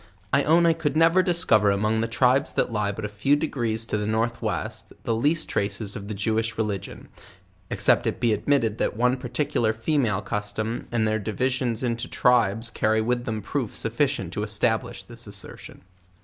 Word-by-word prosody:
I 140 Hz, -, +5 dB
own 170 Hz, +3 st, +4 dB
I 165 Hz, -, +5 dB
could 155 Hz, -2 st, -2 dB
never 165 Hz, +3 st, +5 dB
discover 165 Hz, -, +3 dB
among 110 Hz, +3 st, +1 dB
the 115 Hz, -, 0 dB
tribes 130 Hz, +3 st, +2 dB
that -, -, 0 dB
lie 105 Hz, -2 st, 0 dB
but 105 Hz, +1 st, -6 dB
a -, -, -1 dB
few 105 Hz, +8 st, +1 dB
degrees 120 Hz, -7 st, -1 dB
to 105 Hz, -, -2 dB
the 105 Hz, -, -2 dB
north 115 Hz, +2 st, -1 dB
west, -, -, -4 dB
the 115 Hz, -, 0 dB
least 150 Hz, +8 st, +1 dB
traces 100 Hz, 0 st, -2 dB
of 100 Hz, 0 st, -7 dB
the 105 Hz, -, -4 dB
Jewish 110 Hz, +3 st, -1 dB
religion, 105 Hz, -4 st, -4 dB, 0.6 s
ex -, -, -3 dB
cept -, -, +4 dB
it -, -, -2 dB
be 115 Hz, -2 st, +2 dB
admitted 115 Hz, 0 st, +1 dB
that -, -, -1 dB
one 125 Hz, +2 st, +3 dB
particular 120 Hz, -4 st, -1 dB
female 110 Hz, -3 st, 0 dB
custom, 110 Hz, +2 st, -3 dB
and 115 Hz, -2 st, +1 dB
their 110 Hz, 0 st, 0 dB
divisions 120 Hz, +3 st, -1 dB
into 115 Hz, -2 st, -2 dB
tribes 115 Hz, -2 st, +2 dB
carry 110 Hz, +1 st, +1 dB
with 120 Hz, +2 st, -1 dB
them 110 Hz, -2 st, -3 dB
proof 125 Hz, 0 st, -3 dB
sufficient 115 Hz, -, -1 dB
to 105 Hz, -, -3 dB
establish 105 Hz, -1 st, -1 dB
this 115 Hz, +2 st, -10 dB
assertion. 100 Hz, -1 st, -6 dB
115 Hz, 185 wpm, -25 LUFS, 105-125 Hz, 0.6 s, I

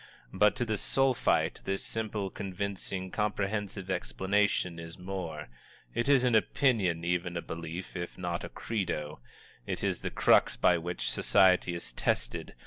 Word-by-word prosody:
But 105 Hz, +2 st, +4 dB
to 120 Hz, -, -1 dB
the 110 Hz, -2 st, -1 dB
Sulphite, 135 Hz, -2 st, +2 dB
this 95 Hz, 0 st, -1 dB
simple, 105 Hz, -3 st, -3 dB
convincing, 95 Hz, -1 st, -4 dB
comprehensive 105 Hz, -2 st, -2 dB
explanation 90 Hz, +4 st, 0 dB
is 80 Hz, 0 st, -8 dB
more; 90 Hz, -5 st, -5 dB, 0.5 s
it 120 Hz, +4 st, 0 dB
is 135 Hz, -3 st, +5 dB
an 125 Hz, -2 st, +3 dB
opinion, 105 Hz, -7 st, +2 dB
even 90 Hz, 0 st, -1 dB
a -, -, -2 dB
belief, 85 Hz, +3 st, -6 dB
if 85 Hz, -1 st, -5 dB
not 85 Hz, -1 st, -3 dB
a -, -, -5 dB
credo. 80 Hz, -, -3 dB, 0.5 s
It -, -, -3 dB
is -, -, 0 dB
the -, -, -2 dB
crux -, -, +4 dB
by 85 Hz, -1 st, +4 dB
which 85 Hz, +2 st, -3 dB
society 90 Hz, -2 st, +4 dB
is 85 Hz, -, -7 dB
tested. -, -, -1 dB
95 Hz, 145 wpm, -30 LUFS, 85-105 Hz, 0.5 s, is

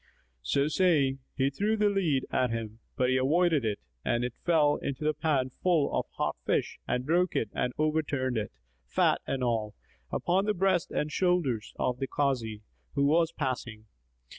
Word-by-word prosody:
So 140 Hz, 0 st, +1 dB
saying, 150 Hz, -6 st, +2 dB, 0.2 s
he 135 Hz, 0 st, +1 dB
threw 210 Hz, +9 st, 0 dB
the 210 Hz, 0 st, +3 dB
lead 165 Hz, -10 st, +1 dB
at 125 Hz, -, +2 dB
him, 115 Hz, -1 st, -4 dB, 0.2 s
but 125 Hz, 0 st, +2 dB
he 130 Hz, -, +3 dB
avoided 155 Hz, +2 st, +3 dB
it 105 Hz, -2 st, -1 dB, 0.2 s
and 120 Hz, 0 st, 0 dB
it 125 Hz, -1 st, -2 dB
fell 155 Hz, -4 st, +2 dB
into 140 Hz, +1 st, -4 dB
the 155 Hz, 0 st, +2 dB
pan 145 Hz, -4 st, 0 dB
full 170 Hz, 0 st, +1 dB
of -, -, -1 dB
hot -, -, -2 dB
fish -, -, -1 dB
and 125 Hz, 0 st, -1 dB
broke 175 Hz, +4 st, +2 dB
it 110 Hz, -, 0 dB
and 125 Hz, -, -1 dB
overturned 150 Hz, -4 st, 0 dB
it, 105 Hz, -, -4 dB, 0.3 s
fat -, -, +2 dB
and 135 Hz, -2 st, -1 dB
all, 110 Hz, -3 st, -1 dB, 0.4 s
upon 190 Hz, +3 st, +1 dB
the 210 Hz, 0 st, +1 dB
breast 185 Hz, -2 st, +2 dB
and 150 Hz, -, -2 dB
shoulders 160 Hz, -, 0 dB
of 125 Hz, 0 st, -1 dB
the 135 Hz, -, -2 dB
Kazi, 120 Hz, -8 st, -1 dB, 0.3 s
who 140 Hz, -1 st, +3 dB
was 165 Hz, +3 st, +3 dB
passing. 125 Hz, -6 st, -4 dB
140 Hz, 175 wpm, -29 LUFS, 125-165 Hz, 0.4 s, the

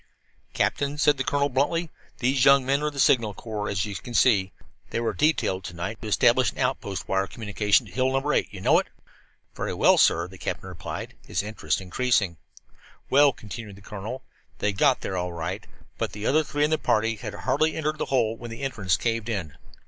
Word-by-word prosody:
"Captain," 145 Hz, +1 st, 0 dB
said 150 Hz, -1 st, +3 dB
the 135 Hz, -, -1 dB
colonel 140 Hz, +1 st, +1 dB
bluntly, 150 Hz, +5 st, 0 dB, 0.3 s
"these 130 Hz, +1 st, +1 dB
young 135 Hz, -1 st, +6 dB
men 140 Hz, +2 st, +1 dB
are 150 Hz, -, 0 dB
of 150 Hz, -, -3 dB
the 140 Hz, -, -6 dB
Signal 115 Hz, -6 st, +3 dB
Corps, 105 Hz, -2 st, -4 dB
as 95 Hz, -2 st, 0 dB
you 105 Hz, -, -6 dB
you -, -, -6 dB
can 120 Hz, +5 st, -8 dB
see. 100 Hz, -5 st, +4 dB, 0.4 s
They -, -, -2 dB
were 115 Hz, -1 st, -1 dB
detailed 145 Hz, -11 st, +1 dB
to 90 Hz, -, -7 dB
night 95 Hz, +7 st, -5 dB
to 110 Hz, -, -6 dB
establish 120 Hz, +4 st, +4 dB
an -, -, -19 dB
outpost 125 Hz, -7 st, -2 dB
wire 95 Hz, 0 st, +1 dB
communication 105 Hz, -2 st, +1 dB
to -, -, -13 dB
Hill 130 Hz, 0 st, +1 dB
No. 145 Hz, +2 st, -1 dB
8. -, -, +1 dB
You 95 Hz, -2 st, -9 dB
know -, -, +5 dB
it?" -, -, -4 dB, 0.7 s
"Very -, -, -3 dB
well, -, -, +5 dB
sir," 85 Hz, +1 st, +4 dB
the 95 Hz, 0 st, -13 dB
captain -, -, -4 dB
replied, -, -, -6 dB
his 95 Hz, -, -2 dB
interest 105 Hz, +1 st, -2 dB
increasing. 95 Hz, -2 st, 0 dB, 0.7 s
"Well," 140 Hz, +1 st, +6 dB
continued 105 Hz, -3 st, -9 dB
the 100 Hz, -, -15 dB
colonel, 105 Hz, +5 st, -6 dB, 0.3 s
"they 105 Hz, -, 0 dB
got 130 Hz, +6 st, +3 dB
there 95 Hz, -, -3 dB
all 90 Hz, 0 st, -2 dB
right. 85 Hz, -1 st, -5 dB, 0.3 s
But -, -, -2 dB
the 105 Hz, +1 st, -6 dB
other 155 Hz, +3 st, +3 dB
three 145 Hz, 0 st, -1 dB
in 150 Hz, -, +2 dB
the 155 Hz, -, +2 dB
party 115 Hz, +1 st, +1 dB
had -, -, -6 dB
hardly 155 Hz, 0 st, +1 dB
entered 155 Hz, -1 st, -2 dB
that -, -, 0 dB
hole 115 Hz, -4 st, +1 dB
when 120 Hz, +1 st, -9 dB
the 115 Hz, +4 st, -7 dB
entrance 100 Hz, -10 st, 0 dB
caved 115 Hz, -1 st, -2 dB
in." 90 Hz, -10 st, -3 dB
115 Hz, 215 wpm, -25 LUFS, 100-135 Hz, 0.7 s, young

